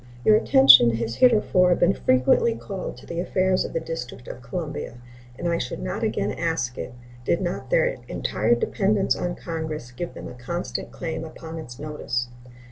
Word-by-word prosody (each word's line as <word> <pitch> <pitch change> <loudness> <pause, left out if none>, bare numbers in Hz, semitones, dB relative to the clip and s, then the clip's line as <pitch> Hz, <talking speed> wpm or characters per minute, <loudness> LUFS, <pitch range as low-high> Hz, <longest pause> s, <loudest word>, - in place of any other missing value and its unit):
Your 215 - +7
attention 135 - +7
has 115 0 -2
heretofore 195 -7 +4
been 175 +3 +3
frequently 130 - +3
called 195 -4 -6
to - - -14
the 170 - -5
affairs 185 +1 +1
of - - -6
the - - 0
District 125 -7 -7
of 125 - -8
Columbia, 150 0 -5 0.4
and 175 - -3
I 170 0 +1
should 125 - -4
not 60 - -4
again 100 +1 -1
ask 160 -4 -2
it 120 - -6 0.3
did 170 - +1
not 175 -2 -4
their - - +2
entire - - +1
dependence 210 - +1
on 175 -1 -3
Congress 160 -6 -5
give 170 +8 -6
them - - -8
a - - -8
constant 170 +9 -5
claim 160 -2 -5
upon 160 0 -8
its 125 -6 -9
notice. 140 -5 -3
165 Hz, 175 wpm, -24 LUFS, 125-180 Hz, 0.4 s, Your